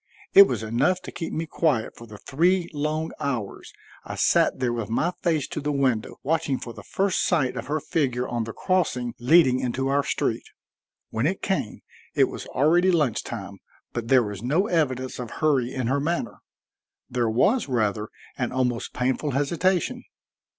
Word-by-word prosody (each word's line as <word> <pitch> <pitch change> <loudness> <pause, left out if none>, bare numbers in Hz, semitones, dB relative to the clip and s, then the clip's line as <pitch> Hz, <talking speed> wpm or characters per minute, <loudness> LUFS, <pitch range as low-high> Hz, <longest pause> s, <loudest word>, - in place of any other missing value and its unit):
It 200 0 +10
was 115 -4 -3
enough 120 +12 +1
to - - -7
keep 165 - -5
me 165 - -2
quiet 155 -7 0
for 115 - -12
the 105 -1 -11
three 175 - +1
long 155 +2 -2
hours 125 -9 -4 0.3
I - - -6
sat - - +3
there 125 -2 0
with 115 -2 -4
my 160 +10 +1
face 160 -5 +1
to - - -4
the 150 +1 -1
window, 130 -6 0
watching 155 -3 0
for 120 - -8
the 105 - -10
first 190 - 0
sight 150 -8 +1
of - - -5
her 155 +2 0
figure 130 -5 -1
on 120 -2 -2
the 115 - -5
crossing 125 - 0
leading 130 0 +5
into 130 +1 -1
our 140 +1 +3
street. - - -1 0.7
When 115 +6 0
it 190 +3 -3
came, 190 - -2 0.3
it - - +5
was - - -7
already 170 +7 +3
lunch 150 - +2
time, 100 -4 -7 0.3
but 120 -1 -4
there 130 0 +5
was 105 -2 -6
no 150 - +1
evidence 130 - -1
of 120 -2 -5
hurry 135 -5 +1
in 130 -2 -3
her 135 +4 +1
manner; 165 +4 -2 0.7
there 120 -2 0
was, 195 - +2
rather, 110 -4 0 0.3
an 120 - -1
almost 125 -2 -1
painful 130 +4 0
hesitation. 180 - 0
135 Hz, 180 wpm, -25 LUFS, 120-160 Hz, 0.7 s, It